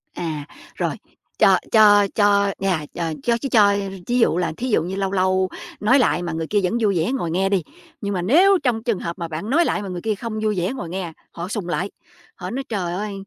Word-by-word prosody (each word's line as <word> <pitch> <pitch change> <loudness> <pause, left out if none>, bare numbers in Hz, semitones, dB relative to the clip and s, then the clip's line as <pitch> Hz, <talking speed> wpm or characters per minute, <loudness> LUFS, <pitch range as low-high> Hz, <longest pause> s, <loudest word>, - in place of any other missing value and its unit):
À, 155 -4 -4 0.3
rồi, - - -1 0.4
cho - - +6
cho 205 -2 +6
cho 200 -1 +3
nhà 185 -6 0
ch - - -9 0.2
cho 235 -1 +2
ch 275 - -4
cho 205 -3 +5 0.3
thí 245 +1 +1
dụ 230 - +3
là, 180 - 0
thí 250 - -3
dụ 185 -8 +2
như 180 +3 -4
lâu 195 -1 -1
lâu 185 -1 +1 0.3
nói 245 +7 +4
lại 210 -8 +2
mà 170 -1 -3
người 160 0 -3
kia 205 - +1
vẫn 180 - 0
vui 200 -4 +2
vẻ 165 +8 0
ngồi 205 -12 -2
nghe 190 +3 +1
đi. 195 -3 +1 0.4
Nhưng 200 0 -2
mà 180 - -1
nếu 355 - +5
trong 235 -4 0
trường 230 -5 0
hợp 170 +2 -5
mà 170 - -3
bạn 165 +6 -5
nói 335 +6 +3
lại 210 - 0
mà 200 - -6
người 180 -1 -5
kia 215 +1 -1
không 220 +1 -5
vui 215 -1 +1
vẻ 180 +7 -1
ngồi 175 -11 -6
nghe, 180 -2 -4 0.2
họ 170 +1 -6
sùng 200 -2 -4
lại, 180 +2 -1 0.5
họ 180 -1 -6
nói: 265 +5 -3
"Trời 185 -6 -2
ơi, 205 +3 -3
200 Hz, 245 wpm, -22 LUFS, 175-220 Hz, 0.5 s, cho